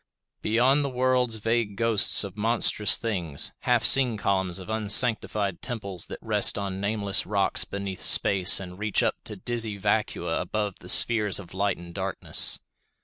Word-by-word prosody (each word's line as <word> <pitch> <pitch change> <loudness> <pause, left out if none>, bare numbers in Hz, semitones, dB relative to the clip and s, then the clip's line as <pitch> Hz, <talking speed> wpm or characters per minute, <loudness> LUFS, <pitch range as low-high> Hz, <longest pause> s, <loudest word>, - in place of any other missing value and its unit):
Beyond 125 +6 +1
the 140 - -3
worlds 125 -2 -1
vague 115 -1 -3
ghosts 110 -6 +3
of 100 -1 -9
monstrous 105 -1 +2
things; 90 -11 -2
half 120 -3 0
seen 125 0 +6
columns 95 -3 -2
of 95 - -9
unsanctified 105 -3 +1
temples 105 -7 -4
that - - -9
rest - - +2
on 100 -1 -5
nameless 100 -1 -1
rocks 100 -1 -1
beneath 100 -1 -7
space 95 -2 +5
and 90 -1 -11
reach 105 -1 -1
up - - -2
to - - -8
dizzy 115 -4 -3
vacua 100 - -2
above 105 -3 -5
the 90 - -13
spheres 105 -2 +3
of 95 -3 -8
light 100 +2 -2
and 85 0 -13
darkness. 95 -1 -1
105 Hz, 155 wpm, -24 LUFS, 95-115 Hz, -, seen